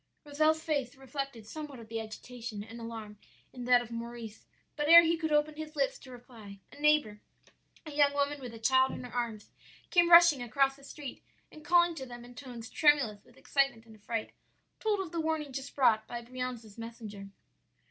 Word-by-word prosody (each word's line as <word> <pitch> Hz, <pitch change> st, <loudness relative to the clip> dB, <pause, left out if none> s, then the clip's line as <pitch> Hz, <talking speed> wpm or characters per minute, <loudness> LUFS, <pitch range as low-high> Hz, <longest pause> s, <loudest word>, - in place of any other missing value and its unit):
Rozel's 310 Hz, +2 st, +2 dB
face 280 Hz, -5 st, -1 dB
reflected 270 Hz, -3 st, -6 dB
somewhat 290 Hz, +2 st, -8 dB
of 225 Hz, -, -11 dB
the 225 Hz, 0 st, -4 dB
agitation 220 Hz, 0 st, -7 dB
and 225 Hz, +2 st, -10 dB
alarm 220 Hz, -2 st, -8 dB, 0.3 s
in 250 Hz, -1 st, -7 dB
that 245 Hz, -1 st, +5 dB
of 235 Hz, -, -13 dB
Maurice; 230 Hz, -1 st, -7 dB, 0.3 s
but 295 Hz, 0 st, -1 dB
ere 335 Hz, +1 st, +11 dB
he 330 Hz, 0 st, +2 dB
could 320 Hz, -1 st, -3 dB
open 300 Hz, +1 st, +2 dB
his 310 Hz, 0 st, -7 dB
lips 275 Hz, -2 st, 0 dB
to 265 Hz, -, -14 dB
reply, 230 Hz, -5 st, -12 dB
a -, -, -14 dB
neighbor, 295 Hz, -9 st, +2 dB, 0.6 s
a 305 Hz, -, -7 dB
young 290 Hz, -1 st, +4 dB
woman 285 Hz, 0 st, -1 dB
with 250 Hz, -2 st, -7 dB
a -, -, -8 dB
child 260 Hz, +3 st, +3 dB
in -, -, -6 dB
her 250 Hz, -, -9 dB
arms, 230 Hz, -4 st, -3 dB, 0.4 s
came 345 Hz, -1 st, +5 dB
rushing 340 Hz, -5 st, +8 dB
across 270 Hz, +3 st, +1 dB
the 275 Hz, -, -19 dB
street, 280 Hz, -1 st, -8 dB, 0.3 s
and 310 Hz, -, -13 dB
calling 345 Hz, 0 st, +4 dB
to 265 Hz, -5 st, -7 dB
them 240 Hz, -1 st, -10 dB
in 245 Hz, -, -13 dB
tones 245 Hz, -4 st, -9 dB
tremulous 275 Hz, -9 st, +3 dB
with 245 Hz, -, -22 dB
excitement 275 Hz, -4 st, 0 dB
and 220 Hz, -1 st, -15 dB
affright, 215 Hz, +1 st, -4 dB, 0.5 s
told 425 Hz, -2 st, 0 dB
of 360 Hz, -4 st, -6 dB
the 335 Hz, -1 st, -2 dB
warning 315 Hz, -3 st, -2 dB
just 270 Hz, +1 st, -6 dB
brought 220 Hz, -5 st, +3 dB
by 240 Hz, -, -5 dB
Brianza's 245 Hz, -3 st, -6 dB
messenger. 215 Hz, -4 st, -8 dB
255 Hz, 195 wpm, -31 LUFS, 230-295 Hz, 0.6 s, ere